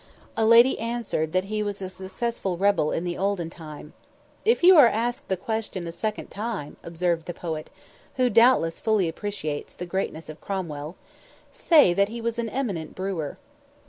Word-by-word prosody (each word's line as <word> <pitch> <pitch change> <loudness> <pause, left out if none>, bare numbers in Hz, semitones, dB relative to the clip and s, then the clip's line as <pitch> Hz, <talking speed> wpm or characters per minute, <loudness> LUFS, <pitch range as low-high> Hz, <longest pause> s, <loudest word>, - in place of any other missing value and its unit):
A 220 - +2
lady 235 +3 +6
answered 230 -9 -2
that 185 +2 +1
he 215 +2 -3
was 205 -1 -3
a 190 - -4
successful 190 +1 -4
rebel 195 -5 +2
in 165 - -1
the 175 -1 -3
olden 190 -4 -1
time! 155 -2 -10 0.5
"If 460 -3 +2
you 370 +1 +9
are 280 -5 +9
asked 235 +2 -2
the 190 - -1
question 205 -2 -3
a 170 - -5
second 215 +5 -4
time," 205 -8 -5
observed 170 -1 -2
the 175 - -5
poet, 160 -3 -5 0.5
who 255 -1 +3
doubtless 230 -8 +4
fully 215 -5 +2
appreciates 165 -5 -5
the 180 - -6
greatness 175 -3 -3
of 155 0 -10
Cromwell, 165 -5 -5 0.6
"say 295 - +5
that 200 +3 +2
he 235 +2 -6
was 235 0 -2
an 230 -1 -2
eminent 205 - -3
brewer." 185 -6 -3
195 Hz, 175 wpm, -25 LUFS, 170-230 Hz, 0.6 s, you